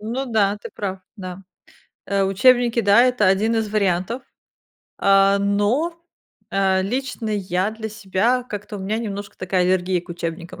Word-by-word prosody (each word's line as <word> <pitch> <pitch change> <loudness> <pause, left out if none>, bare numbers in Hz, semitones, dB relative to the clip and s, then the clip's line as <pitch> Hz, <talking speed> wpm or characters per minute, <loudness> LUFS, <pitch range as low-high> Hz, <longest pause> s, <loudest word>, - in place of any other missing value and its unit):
Ну 240 +6 -3
да, 210 -4 +1
ты - - -9
прав, 190 -2 -4 0.2
да. 185 -1 -8 0.6
А, 195 -1 +1
учебники, 240 +4 +3
да, 205 +3 +5
это 250 -5 +3
1 205 +5 +2
из 220 -1 0
вариантов. 205 +3 0 0.8
А, 195 0 +4
но, 210 +13 0 0.5
а, 190 -1 +2
лично 240 +1 -3
я 190 -1 -1
для 220 0 -6
себя, 215 +4 0
как-то 210 -3 -7
у - - -7
меня 210 +4 -2
немножко 205 -2 -6
такая 185 0 0
аллергия 185 0 +1
к 175 - -22
учебникам, 170 0 -6
200 Hz, 155 wpm, -21 LUFS, 190-225 Hz, 0.8 s, да